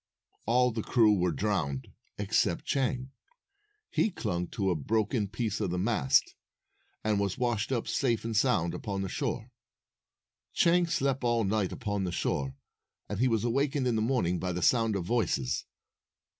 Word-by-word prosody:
All 125 +2 +4
the 110 0 -3
crew 110 -1 +4
were 90 -3 +1
drowned 80 -9 -1 0.3
except 100 -4 0
Chang. 130 -1 -1 0.8
He - - +2
clung 90 - -3
to 95 -2 -1
a - - +1
broken 105 - 0
piece 110 0 -3
of 100 - 0
the 90 - -2
mast, 95 - +2 0.7
and 105 -2 +1
was 100 -2 -1
washed 120 -2 0
up 120 -3 -1
safe 120 -5 0
and 115 -1 -2
sound 105 -7 +2
upon 100 -2 -3
the 95 - -3
shore. 120 -1 -3 1.0
Chang 175 +1 +4
slept 140 -6 0
all 120 -1 +2
night 100 -1 0
upon 105 -5 -2
the 90 - -2
shore, 70 -5 -2 0.5
and 105 - -4
he 130 - +4
was 115 -3 +1
awakened 135 +3 +1
in 120 -2 +1
the 110 - +1
morning 110 -8 +1
by 90 +1 -2
the 90 0 -3
sound 115 -3 +3
of 95 -3 -2
voices. 85 - 0
110 Hz, 165 wpm, -29 LUFS, 95-125 Hz, 1.0 s, All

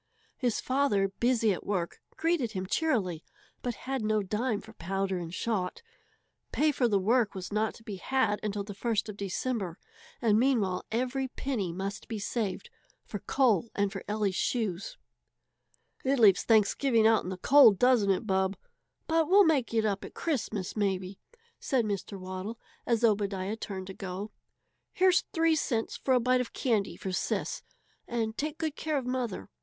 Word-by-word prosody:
His 245 -4 0
father, 255 -8 +1
busy 235 -4 +3
at - - -6
work, 180 -4 -2 0.2
greeted 320 -9 0
him 185 -1 -3
cheerily, 190 - 0 0.4
but 245 -2 -3
had 265 -1 -1
no 215 -1 +1
dime 215 +3 -1
for 220 +1 -13
powder 195 0 -2
and 165 -1 -6
shot. 190 - -2 0.7
Pay 305 +1 +3
for 255 -3 +1
the 205 -3 +2
work 220 +3 +2
was 190 +1 -6
not 215 +1 0
to 225 - -15
be 210 -4 -6
had 260 -1 +1
until 205 -1 -2
the 205 0 -7
first 220 0 -1
of 210 - -6
December, 200 -2 -3 0.4
and 220 -2 +3
meanwhile 225 -8 +1
every 255 +3 -1
penny 245 -9 -3
must 195 +3 -5
be 225 - -4
saved 215 - -3 0.3
for 205 - -5
coal 235 -5 +2
and 200 -1 +1
for 195 -2 -6
Ellie's 210 -2 0
shoes. 210 -5 -1 1.1
"It 270 +1 +2
leaves 205 -6 +6
Thanksgiving 225 +2 +3
out 225 -1 +5
in - - -5
the 185 - -4
cold, 245 -1 +7
doesn't 245 -4 +4
it, 195 +3 +1
Bub? 190 -1 +1 0.5
But 325 -1 +1
we'll 400 +2 +7
make 290 -7 +2
it 225 -1 +1
up 200 -2 -1
at - - -10
Christmas, 220 - -2
maybe," 190 -2 -1 0.4
said 255 -4 +1
Mr. 200 -1 -4
Waddle, 185 +5 -6 0.3
as 235 -1 +1
Obadiah 200 -2 +1
turned 195 -4 -6
to 190 - -7
go. 190 +2 -6 0.6
"Here's 370 0 +4
three 325 0 +3
cents 235 -7 -1
for 260 - +1
a - - +4
bite 250 +1 +3
of 250 - -6
candy 225 -7 0
for 190 - -4
Sis, 185 - -2 0.5
and 225 -2 -2
take 305 +3 -3
good 315 -3 -2
care 310 -2 -1
of 265 - -2
mother. 250 -6 -3
220 Hz, 170 wpm, -29 LUFS, 195-255 Hz, 1.1 s, cold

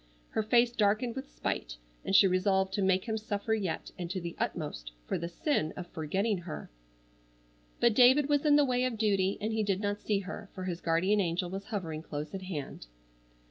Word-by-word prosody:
Her - - +1
face 235 +2 +4
darkened 230 +2 +1
with 265 +1 -6
spite, - - -3 0.3
and 195 - 0
she 200 - +8
resolved 190 +1 +2
to 200 - 0
make 190 -1 +2
him 220 -2 -2
suffer 215 +1 -2
yet, 195 -6 -2
and 175 -1 -4
to 185 +1 -2
the 170 -1 -6
utmost, - - -3
for - - -2
the 170 - -4
sin 170 - 0
of 180 - -5
forgetting 190 +6 -1
her. 170 - -7 1.1
But 235 - +4
David 260 +5 +6
was 290 -1 +2
in 295 -2 +5
the 290 -1 +5
way 250 -1 +1
of 245 -3 -2
duty, 200 -3 +2
and 215 +1 -2
he 220 - +1
did 200 -3 0
not 205 0 -2
see 210 - +1
her, 200 +1 -7
for 185 - -5
his 180 -2 -3
guardian 180 +5 +2
angel 175 0 -1
was 195 +1 -5
hovering 165 -7 -4
close 150 -1 -6
at 195 - -4
hand. 150 - -6
195 Hz, 205 wpm, -31 LUFS, 175-220 Hz, 1.1 s, she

